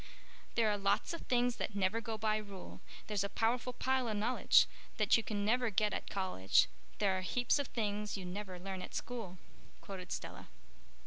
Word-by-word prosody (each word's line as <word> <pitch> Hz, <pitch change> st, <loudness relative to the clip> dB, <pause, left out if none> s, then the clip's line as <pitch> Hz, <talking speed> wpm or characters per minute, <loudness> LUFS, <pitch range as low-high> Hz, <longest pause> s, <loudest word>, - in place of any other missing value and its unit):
"'There 230 Hz, -2 st, +4 dB
are 205 Hz, -1 st, +1 dB
lots 200 Hz, +11 st, +1 dB
of 335 Hz, -, -5 dB
things 245 Hz, -1 st, +2 dB
that 205 Hz, -, -3 dB
never 200 Hz, +3 st, +1 dB
go 225 Hz, -2 st, -4 dB
by 215 Hz, 0 st, +1 dB
rule, 200 Hz, -3 st, -8 dB, 0.2 s
There's 205 Hz, -2 st, 0 dB
a 200 Hz, -, -2 dB
powerful 235 Hz, +4 st, +1 dB
pile 260 Hz, 0 st, 0 dB
o' 220 Hz, -, 0 dB
knowledge 220 Hz, +5 st, +5 dB, 0.3 s
That -, -, +5 dB
you 230 Hz, -, +2 dB
never 225 Hz, +4 st, +2 dB
get 210 Hz, +1 st, +2 dB
at -, -, -3 dB
college, 185 Hz, -, +3 dB, 0.3 s
There 195 Hz, -2 st, +2 dB
are 185 Hz, -, -1 dB
heaps 245 Hz, +8 st, +1 dB
of 280 Hz, -, -1 dB
things 210 Hz, -2 st, -2 dB
you 190 Hz, -, -6 dB
never 185 Hz, 0 st, -5 dB
learn 190 Hz, +1 st, -5 dB
at -, -, -7 dB
school,'" 225 Hz, -7 st, -4 dB, 0.4 s
quoted 190 Hz, -2 st, -8 dB
Stella. -, -, -5 dB
210 Hz, 185 wpm, -35 LUFS, 195-235 Hz, 0.4 s, knowledge